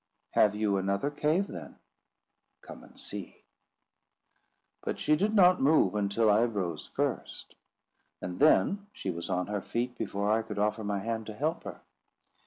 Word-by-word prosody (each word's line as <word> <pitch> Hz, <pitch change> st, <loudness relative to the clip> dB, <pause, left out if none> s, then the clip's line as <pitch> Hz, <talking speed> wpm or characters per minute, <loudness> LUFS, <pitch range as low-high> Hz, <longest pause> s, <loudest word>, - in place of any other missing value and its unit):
"Have 105 Hz, -1 st, +4 dB
you 105 Hz, -2 st, +1 dB
another 100 Hz, +8 st, 0 dB
cave, 155 Hz, +6 st, +1 dB
then?" -, -, -9 dB, 0.9 s
"Come -, -, -11 dB
and -, -, -17 dB
see." -, -, -7 dB, 1.4 s
But -, -, -3 dB
she 150 Hz, -, +2 dB
did 210 Hz, +7 st, 0 dB
not 185 Hz, -2 st, +6 dB
move 150 Hz, -1 st, +4 dB
until 105 Hz, +2 st, +1 dB
I 105 Hz, +2 st, +5 dB
rose 95 Hz, -9 st, -3 dB
first, -, -, -3 dB, 0.7 s
and 90 Hz, 0 st, -6 dB
then 200 Hz, +7 st, +4 dB
she 95 Hz, -, -4 dB
was 85 Hz, 0 st, -6 dB
on 90 Hz, -1 st, 0 dB
her 105 Hz, 0 st, -3 dB
feet 120 Hz, +4 st, -3 dB
before 100 Hz, -2 st, -1 dB
I 110 Hz, +1 st, +3 dB
could 110 Hz, -, -7 dB
offer 105 Hz, +2 st, 0 dB
my 100 Hz, -1 st, -1 dB
hand 110 Hz, +2 st, -3 dB
to 110 Hz, -, -7 dB
help 155 Hz, +7 st, -2 dB
her. -, -, -8 dB
110 Hz, 160 wpm, -30 LUFS, 100-145 Hz, 1.4 s, not